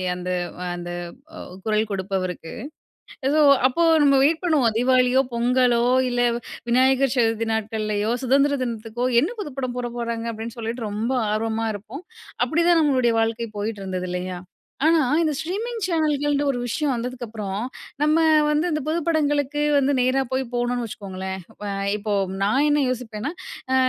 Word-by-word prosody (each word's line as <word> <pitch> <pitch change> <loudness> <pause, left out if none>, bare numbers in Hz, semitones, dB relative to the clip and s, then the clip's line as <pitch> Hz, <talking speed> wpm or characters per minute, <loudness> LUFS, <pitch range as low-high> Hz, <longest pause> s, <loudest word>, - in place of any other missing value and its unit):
அந்த 180 0 -5 0.3
அ - - -4
அந்த 175 0 -6 0.5
அ - - -8 0.3
குரல் 215 0 +1
கொடுப்பவருக்கு. 185 -3 -3 0.8
ஏதோ 305 +1 +3 0.3
அப்போ 335 +6 +1 0.2
நம்ம 275 -1 +5
வெயிட் 320 +4 +2
பண்ணுவோம். 265 -10 +2
தீபாவளியோ, 255 +1 +4
பொங்கலோ, 240 0 +3 0.3
இல்ல 245 - -1 0.5
விநாயகர் 265 +1 +3
சதுர்த்தி 225 -1 +1
நாட்கள்ளையோ, 215 0 -1
சுதந்திர 275 +2 +3
தினத்துக்கோ 230 +1 -4 0.2
என்ன 315 - 0
புது 300 -8 -6
படம் 255 -2 -3
போட 240 -1 -2
போறாங்க? 230 0 -3
அப்டீன்னு 225 +2 -7
சொல்லிட்டு, 225 0 -4
ரொம்ப 220 +5 -2 0.2
ஆர்வமா 225 +1 -1
இருப்போம். 220 - -9 0.4
அப்பிடி 335 +1 +1
தான் 340 -1 +5
நம்மளுடைய 255 -5 +2
வாழ்க்கை 225 0 -1
போயிட்டு 210 -1 -3
இருந்தது 185 -1 -3
இல்லயா? 180 0 -4 0.5
ஆனா, 325 -1 +5 0.2
இந்த 310 -2 +1
ஸ்ட்ரீமிங் 435 +8 -3
சேனல்கள்ன்டு 295 -4 +1
ஒரு 245 - -4
விஷயம் 290 +4 0
வந்ததுக்கு 245 +1 -4
அப்புறம், 205 -3 -4 0.4
நம்ம 305 +1 +3 0.3
வந்து 300 +3 +1
இந்த 305 -1 -1
புது 325 +2 +1
படங்களுக்கு 295 -2 +1
வந்து 280 0 +3
நேரா 255 +2 +2
போய் 260 0 0
போணுன்ன 245 0 0
வச்சுக்கோங்களேன், 190 -2 -6
இப்ப 210 - -10 0.3
இப்போ 210 0 -3 0.3
நான் 265 +9 +2
என்ன 295 0 +3
யோசிப்பேன்னா, 240 +1 -4 0.4
அ - - +4
245 Hz, 150 wpm, -23 LUFS, 220-285 Hz, 0.8 s, நம்ம